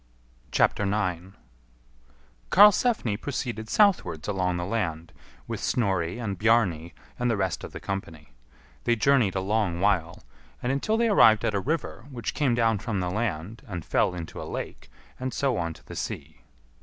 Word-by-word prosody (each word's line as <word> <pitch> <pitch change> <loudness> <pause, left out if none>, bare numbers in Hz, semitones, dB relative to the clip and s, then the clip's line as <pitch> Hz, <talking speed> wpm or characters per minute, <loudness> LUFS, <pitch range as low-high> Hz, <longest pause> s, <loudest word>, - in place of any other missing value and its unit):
9. 95 -2 0 1.1
Karlsefni 205 - +5
proceeded 120 -2 -4
southwards 90 - +2
along 90 -3 0
the 85 - -3
land, 85 -6 -3 0.3
with - - -4
Snorri 95 -6 0
and 100 -6 -4
Bjarni 95 -8 +2 0.3
and 125 0 +1
the 115 - +1
rest 95 -2 -1
of - - -7
the - - -7
company. 85 -7 -6 0.6
They 120 - +3
journeyed 120 -4 +3
a 95 - 0
long 100 -3 0
while, 90 -4 0 0.4
and 125 - -1
until 180 +11 0
they 235 0 +3
arrived 115 - +5
at 110 - +1
a 100 - +1
river, 135 - -3
which 120 -5 -4
came 140 -6 +1
down 115 -3 +2
from 105 -1 -2
the 90 -1 -2
land 105 0 -3
and 90 -6 -6
fell 90 - +1
into 85 -2 -7
a - - -5
lake, - - -6 0.3
and 130 -2 -3
so 135 -3 +1
on 85 -2 -1
to - - -18
the - - -9
sea. 75 +3 -6
105 Hz, 165 wpm, -26 LUFS, 90-120 Hz, 1.1 s, Karlsefni